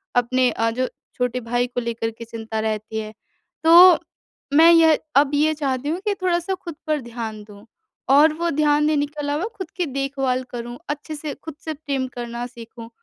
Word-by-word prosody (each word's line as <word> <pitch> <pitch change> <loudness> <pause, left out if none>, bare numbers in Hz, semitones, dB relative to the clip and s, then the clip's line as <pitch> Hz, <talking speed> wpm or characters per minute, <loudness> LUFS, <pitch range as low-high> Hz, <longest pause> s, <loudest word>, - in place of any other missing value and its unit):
अपने 250 +1 +3
अ, 225 +1 0
जो 255 +2 -1 0.3
छोटे 250 0 -1
भाई 245 +2 0
को 245 - -4
लेकर 230 -1 -3
के 230 +1 -10
चिंता 225 -1 -5
रहती 220 0 -3
है। 215 0 -6 0.5
तो, 345 +2 +8 0.5
मैं 325 +3 +8
यह 320 -2 +6 0.2
अब 285 0 +4
ये 310 +2 +3
चाहती 280 -2 -2
हूँ 340 +3 -1
कि 410 - +3
थोड़ा-सा 355 +1 0
खुद 340 -3 -9
पर 305 -2 0
ध्यान 225 -3 -6
दूँ। 205 +1 -15 0.4
और 300 +3 +6
वो 340 +2 -1
ध्यान 300 0 +2
देने 295 -2 +2
के 295 +1 -12
अलावा 290 +6 -1
खुद 375 -4 -6
की 355 - 0
देखभाल 270 -2 -1
करूँ 240 0 -6
अच्छे 295 +1 -4
से 295 -1 -5
खुद 320 -2 -8
से 315 - -2
प्रेम 275 -3 -3
करना 240 0 -5
सीखूँ। 230 -1 -11
270 Hz, 190 wpm, -22 LUFS, 235-310 Hz, 0.5 s, तो